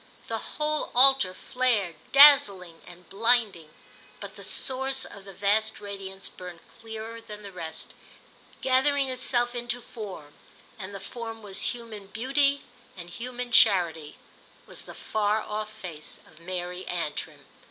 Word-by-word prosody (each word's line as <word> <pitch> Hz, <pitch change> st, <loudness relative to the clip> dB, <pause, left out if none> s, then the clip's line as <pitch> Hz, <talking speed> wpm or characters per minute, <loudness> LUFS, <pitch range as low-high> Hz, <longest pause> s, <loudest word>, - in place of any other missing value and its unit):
The -, -, -2 dB, 0.2 s
whole 305 Hz, 0 st, 0 dB
altar 255 Hz, -7 st, +6 dB
flared—dazzling 210 Hz, -, +4 dB
and 180 Hz, -1 st, -14 dB
blinding; 210 Hz, -6 st, +1 dB, 0.5 s
but -, -, -9 dB
the -, -, -11 dB
source 265 Hz, 0 st, -2 dB
of 200 Hz, -1 st, -12 dB
the 195 Hz, -, -10 dB
vast 205 Hz, +3 st, +1 dB
radiance 195 Hz, -1 st, -7 dB
burned 180 Hz, -2 st, -10 dB, 0.2 s
clearer 225 Hz, 0 st, -7 dB
than 210 Hz, -1 st, -10 dB
the 200 Hz, -, -8 dB
rest, 165 Hz, -3 st, -7 dB, 0.7 s
gathering 265 Hz, +1 st, +2 dB
itself 245 Hz, -1 st, +2 dB
into 240 Hz, 0 st, -1 dB
form, 195 Hz, -11 st, -9 dB, 0.5 s
and 200 Hz, 0 st, -7 dB
the -, -, -6 dB
form 225 Hz, -1 st, -8 dB
was 200 Hz, +4 st, +1 dB
human 220 Hz, -4 st, -9 dB
beauty 275 Hz, +6 st, +1 dB, 0.3 s
and 175 Hz, -1 st, -9 dB
human 245 Hz, +3 st, -6 dB
charity, 170 Hz, -9 st, +4 dB, 0.5 s
was -, -, -5 dB
the -, -, -11 dB
far 215 Hz, 0 st, 0 dB
off 215 Hz, 0 st, -4 dB
face 175 Hz, -8 st, -7 dB
of 155 Hz, -, -19 dB
Mary 180 Hz, +1 st, -5 dB
Antrim. 165 Hz, -4 st, -4 dB
215 Hz, 130 wpm, -27 LUFS, 185-245 Hz, 0.7 s, altar